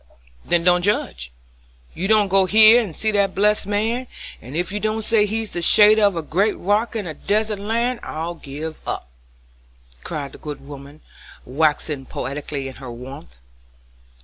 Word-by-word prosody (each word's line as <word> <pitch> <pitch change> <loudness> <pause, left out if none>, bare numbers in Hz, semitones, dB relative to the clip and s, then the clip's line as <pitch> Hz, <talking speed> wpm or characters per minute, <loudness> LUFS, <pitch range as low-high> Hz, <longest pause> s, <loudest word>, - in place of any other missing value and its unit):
"Then 170 -1 +1
don't 180 0 +4
judge. 65 - -1 0.6
You 180 +4 -3
go 195 -3 +3
hear 220 +4 +7
and 190 -9 -6
see 220 - 0
that 200 -2 +1
blessed 210 0 +2
man, 225 +5 -1 0.3
and 130 +7 -7
ef 175 +1 -2
you 210 - -2
don't 215 +1 -2
say 215 -1 +2
he's 220 0 -3
the 175 - -3
shadder 210 +4 +6
of 200 -3 +3
a 165 - -3
great 195 +8 0
rock 210 +5 0
in 215 -3 -3
a 160 - -5
desert 210 +4 -1
land, 235 +4 -1
I'll 165 +2 -5
give 155 0 -8
up," - - -4 1.0
cried 145 -4 -5
the - - -14
good 145 -2 -8
woman, 140 +1 -12 0.4
waxing 150 0 -1
poetical 145 +1 -5
in 135 -1 -6
her 130 -3 -9
warmth. 130 - -11
185 Hz, 165 wpm, -21 LUFS, 150-215 Hz, 1.0 s, hear